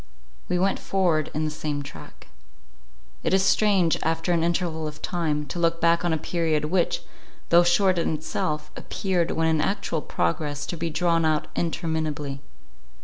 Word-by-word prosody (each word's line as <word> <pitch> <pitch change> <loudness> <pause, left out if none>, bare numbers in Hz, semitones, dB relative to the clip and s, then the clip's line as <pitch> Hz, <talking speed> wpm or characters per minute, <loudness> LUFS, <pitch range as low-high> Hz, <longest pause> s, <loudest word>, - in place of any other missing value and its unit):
We 180 - +1
went 190 +2 +1
forward 175 -6 +1
in 155 +1 -1
the 155 - -2
same 150 -1 -3
track. 80 - -12 1.0
It - - +2
is 190 - +3
strange, 195 -6 +3
after 165 +2 0
an 165 -1 +2
interval 170 -2 -1
of 150 0 -8
time, 155 -4 -1
to 175 - -5
look 165 0 +1
back 170 0 +3
on 175 - +1
a 160 - +2
period, 160 -2 0
which, 175 +2 0 0.5
though 170 +1 +7
short 180 +1 +3
in 165 - 0
itself, 150 -1 -3
appeared, 185 -4 -1
when 160 0 +1
in 160 -1 +2
actual 195 -4 -1
progress, 145 - -2
to - - -4
be 165 0 -2
drawn 165 +1 +1
out 155 -1 +1
interminably. 155 -4 -2
165 Hz, 165 wpm, -25 LUFS, 155-175 Hz, 1.0 s, though